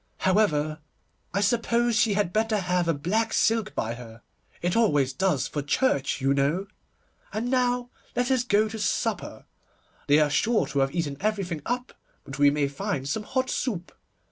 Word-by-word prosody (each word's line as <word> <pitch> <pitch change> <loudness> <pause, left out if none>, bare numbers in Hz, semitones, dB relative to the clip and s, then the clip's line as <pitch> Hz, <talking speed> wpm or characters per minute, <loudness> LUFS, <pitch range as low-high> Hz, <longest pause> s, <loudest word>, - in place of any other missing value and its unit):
However, 155 -6 +1 0.5
I 200 - 0
suppose 235 +2 +2
she 220 -2 +3
had 200 -4 0
better 220 0 +1
have 180 -2 0
a 165 - +3
black 215 +10 0
silk 225 -2 +1
by 115 +1 -1
her; 115 -2 -11 0.4
it 175 0 -1
always 145 - +3
does 165 -2 +1
for 145 - -3
church, 140 - +1
you 135 +1 +2
know. 145 +8 +1 0.7
And 235 +4 -2
now 245 -1 +1 0.2
let 245 +1 +1
us 255 -2 +2
go 215 -2 +2
to 220 +1 -6
supper. 205 - -2 0.6
They 145 - +5
are 150 -1 +3
sure 225 +2 +2
to 140 0 -2
have 135 +3 +1
eaten 150 -5 -2
everything 195 -7 -2
up, 250 +1 -3 0.3
but 135 0 -9
we 145 0 +7
may 145 0 +1
find 140 0 -3
some 210 +10 -1
hot 260 +4 -1
soup. 185 -9 -3
190 Hz, 170 wpm, -26 LUFS, 145-225 Hz, 0.7 s, we